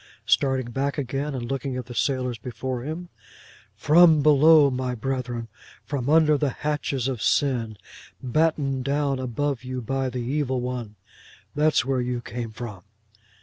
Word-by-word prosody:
'—starting 130 -3 +1
back 140 +3 -2
again, 140 +1 -3
and 120 -2 -4
looking 135 +1 -3
at 125 - -5
the 120 - -9
sailors 125 -2 -1
before 125 +1 -4
him: 160 +6 -6 0.7
'From 155 +5 +5
below, 150 0 +6
my 125 -1 -2
brethren. 125 -1 -3 0.4
From 140 -2 -3
under 155 -2 +4
the 145 - +1
hatches 140 -2 -2
of 130 -5 -3
sin, 120 -6 +1 0.4
battened 135 -1 0
down 140 0 0
above 130 +1 -2
you 130 0 -4
by 135 +2 -2
the 125 - -6
evil 130 +1 -1
one. 120 -4 -4 0.6
That's 150 -2 +2
where 130 -1 0
you 125 0 -2
came 120 0 -6
from! 110 -4 -8
130 Hz, 150 wpm, -24 LUFS, 125-145 Hz, 0.7 s, below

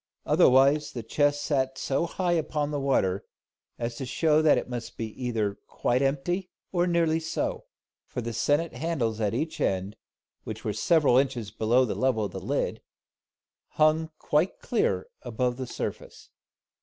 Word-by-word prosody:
Otherwise 140 +3 +4
the 120 - -5
chest 145 +5 +1
sat 130 -3 0
so 140 +6 0
high 180 0 -1
upon 155 -3 0
the 145 - -1
water, 100 -9 +1 0.5
as 115 0 -4
to - - -4
show 155 +4 +2
that 155 -1 +5
it - - -2
must 120 -2 -6
either 110 -1 -2
be 100 - -17
quite 125 +2 0
empty 175 +7 0 0.2
or 175 -1 +1
nearly 165 -2 +2
so; 160 - -3 0.4
for - - -5
the 115 -1 -4
sennit 145 +8 +1
handles 125 -9 -2
at 105 +1 0
each 155 +6 -3
end, 95 +2 0 0.5
which 110 0 -7
were 105 - 0
several 135 - +4
inches 125 -6 -1
below 115 +4 +3
the 115 - -2
level 125 -5 +1
of - - -5
the - - -5
lid, - - -2 1.0
hung 155 +1 +3
quite 155 +6 +1
clear 95 - 0 0.2
above 125 +1 -1
the 130 -1 -4
surface. - - -6
135 Hz, 160 wpm, -27 LUFS, 115-155 Hz, 1.0 s, that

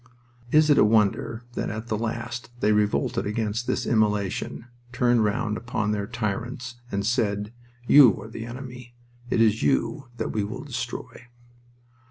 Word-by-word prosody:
Is 155 0 +5
it 145 - +5
a - - +7
wonder 110 +2 +2
that - - -2
at 110 +2 -5
the 110 - -1
last 115 +1 -4
they 105 - +3
revolted 105 -1 +1
against 110 +2 -2
this - - 0
immolation, 105 -1 0 0.3
turned 120 -2 +3
round 105 +1 0
upon 110 -3 -2
their 100 -1 -2
tyrants, 120 +2 -4
and 100 0 -1
said: 105 -1 0 0.3
"You 130 -5 +7
are - - -8
the 115 +1 -7
enemy. 125 -1 -9 0.3
It 115 - +2
is 110 -1 +3
you 75 - 0
that - - -2
we 105 - -1
will 120 +6 -5
destroy"? 125 -2 -6
115 Hz, 155 wpm, -25 LUFS, 105-120 Hz, 0.3 s, a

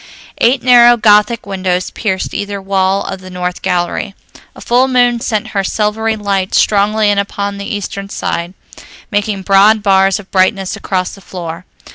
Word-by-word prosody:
Eight 245 +2 +2
narrow 240 -1 +6
Gothic 210 +1 +3
windows 185 -2 -2
pierced 190 -4 -3
either 205 0 -4
wall 195 0 0
of 190 -1 -6
the 185 - -11
north 180 0 -4
gallery. 180 +2 -2 0.4
A - - -13
full 250 +2 +2
moon 245 -2 +2
sent 215 -2 -2
her 195 -1 -1
silvery 220 +2 -1
light 200 -3 -2
strongly 210 +1 +2
in 200 - +1
upon 200 0 -3
the 200 - -6
eastern 200 -1 -5
side, 175 -1 -4 0.6
making 205 -2 -1
broad 205 +2 +4
bars 195 -1 +3
of 195 - -14
brightness 190 0 +1
across 185 -2 -3
the 195 - -13
floor. 175 -1 -7
200 Hz, 160 wpm, -14 LUFS, 190-215 Hz, 0.6 s, narrow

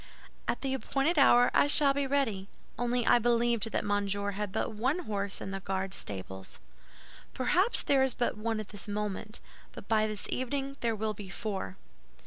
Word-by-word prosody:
"At - - -1
the 270 -1 -1
appointed 275 +4 +1
hour 245 -3 +6
I - - +5
shall 285 -1 +6
be 280 0 -1
ready; 225 -9 0 0.3
only 245 0 0
I 240 - +6
believed 235 -1 +2
that - - -1
Monsieur 205 0 0
had 205 0 -4
but - - -1
one 265 +11 0
horse 200 -2 -2
in 195 - -5
the 195 - -3
Guard 190 0 -3
stables." 95 - -6 0.8
"Perhaps 360 - +2
there 275 -1 +3
is 265 -2 +2
but 240 - 0
one 220 +1 -2
at 215 - -6
this 205 0 -5
moment; 210 +1 -3 0.3
but - - -10
by 215 -1 +3
this 215 -1 -5
evening 275 +2 -2
there 230 -2 0
will 215 0 -1
be 200 -2 -9
four." 190 - -4
220 Hz, 180 wpm, -30 LUFS, 200-260 Hz, 0.8 s, hour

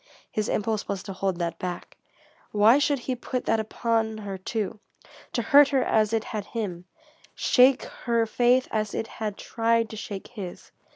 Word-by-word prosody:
His 215 -1 -1
impulse 215 0 -1
was 200 -2 -3
to 195 -1 -6
hold 190 -1 -1
that 170 -1 -3
back. 180 -1 -5 0.6
Why 215 +6 +6
should 290 0 +2
he 255 0 -3
put 250 +1 -4
that 225 - +2
upon 220 0 -1
her, 205 -2 -5
too, 210 +2 -3 0.5
to - - 0
hurt 290 -1 +7
her 270 -3 +2
as 215 -1 +2
it 225 -1 +1
had 210 -3 -5
him, 190 -6 -4 0.5
shake 255 +1 +4
her 235 -2 -1
faith 245 +3 +3
as 215 -1 -1
it - - -1
had 215 -2 -5
tried 230 0 0
to - - -6
shake 205 -2 -7
his? 195 -7 -8
220 Hz, 175 wpm, -26 LUFS, 200-235 Hz, 0.6 s, hurt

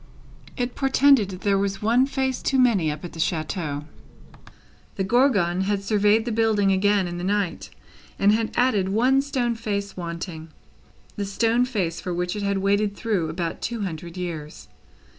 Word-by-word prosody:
It 245 -1 -2
portended 270 -5 +4
that 185 -1 -8
there 200 -1 +2
was 195 0 -2
one 240 +5 +3
stone 270 -1 -1
face 260 -1 -2
too 270 - 0
many, 225 -11 +3
up 150 +3 -7
at 175 - -8
the 165 - -10
chateau. 155 -3 -2 1.1
The 195 - -1
Gorgon 195 -6 +2
had 200 0 -1
surveyed 210 +2 +2
the 240 - -2
building 215 -3 +2
again 195 0 +2
in 175 0 -5
the - - -5
night, 200 -2 -1 0.5
and 200 +1 +4
had 220 +1 +1
added 215 -7 +2
the - - -3
one 255 +5 +3
stone 255 -4 -1
face 205 -3 -4
wanting; 170 -2 -6 0.7
the 205 - -2
stone 230 +5 +1
face 190 -9 -2
for 180 -1 -3
which 180 +2 -2
it 210 - -4
had 200 -1 0
waited 200 +1 +1
through 195 -8 -1
about 165 +1 -4
two 235 -2 -3
hundred 170 -2 -5
years. 160 -4 -6
200 Hz, 180 wpm, -24 LUFS, 180-230 Hz, 1.1 s, portended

